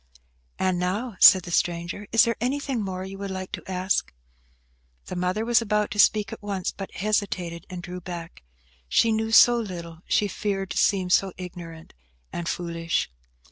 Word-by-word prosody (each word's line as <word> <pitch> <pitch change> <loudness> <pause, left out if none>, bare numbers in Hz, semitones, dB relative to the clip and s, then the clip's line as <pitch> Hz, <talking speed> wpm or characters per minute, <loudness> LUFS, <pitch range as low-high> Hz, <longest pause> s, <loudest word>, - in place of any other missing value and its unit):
"And 185 -1 0
now," 200 +6 -2
said 185 -3 +9
the 175 - -7
stranger, 170 +4 -1
"is 225 - +6
there 230 0 +1
anything 265 -1 -1
more 190 -2 -4
you 195 0 -8
would 200 0 -4
like 185 0 -5
to - - -7
ask?" 185 +1 0 0.9
The - - -6
mother 180 +5 -1
was 235 -1 +4
about 210 0 0
to 210 - -4
speak 210 -1 +4
at - - -9
once, 200 -3 -3
but 195 - -8
hesitated 190 -5 -2
and 180 -2 -7
drew 180 +1 -7
back. 170 -2 -8 0.5
She 225 - +3
knew 220 0 -1
so 240 +2 +7
little; 170 -6 -6
she 205 - +2
feared 195 -1 -3
to - - -4
seem 185 -3 +2
so 190 0 +3
ignorant 170 -3 -9 0.4
and 170 0 -3
foolish. 170 - -2
190 Hz, 175 wpm, -25 LUFS, 175-210 Hz, 0.9 s, said